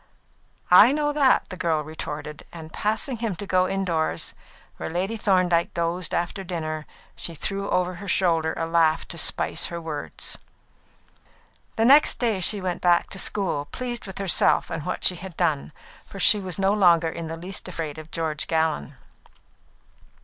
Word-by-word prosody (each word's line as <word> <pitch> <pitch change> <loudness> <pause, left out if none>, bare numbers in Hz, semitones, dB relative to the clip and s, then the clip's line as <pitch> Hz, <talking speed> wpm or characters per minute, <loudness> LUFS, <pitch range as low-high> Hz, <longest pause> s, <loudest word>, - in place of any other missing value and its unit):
"I 205 +7 +9
know 295 0 0
that," 280 -3 +3
the 185 - -6
girl 165 -4 0
retorted; 150 -1 -7
and 160 -2 -10
passing 220 +4 -1
him 225 -4 -3
to 205 - -7
go 185 -1 +2
indoors, 180 -5 0 0.4
where - - -5
Lady 185 +6 -2
Thorndyke 185 -5 +1
dozed 170 +1 -1
after 175 +3 -2
dinner, 155 -4 -4 0.3
she 170 - -6
threw 195 +6 -3
over 180 0 0
her 200 - -8
shoulder 165 -4 +1
a 165 - -1
laugh 165 -1 +2
to 170 - -3
spice - - 0
her 170 - -6
words. 160 -3 -6 1.4
The 225 - +2
next 280 +5 +6
day 225 -5 0
she 200 +3 +4
went 180 -1 -3
back 175 -1 +2
to 195 - -3
school, 180 -8 0
pleased 240 - -5
with 190 - -8
herself 195 -3 +3
and 155 0 -4
what 180 - -3
she 180 - +5
had 180 -1 -9
done, 155 -5 0 0.4
for 195 - -10
she 210 +2 +5
was 185 -3 -4
no 195 0 +2
longer 175 -5 +4
in 165 0 -6
the 165 +1 -6
least 180 +4 -5
afraid 160 -4 -5
of 155 0 -11
George 160 -2 -2
Gallon. 160 -3 -1
175 Hz, 170 wpm, -24 LUFS, 160-195 Hz, 1.4 s, I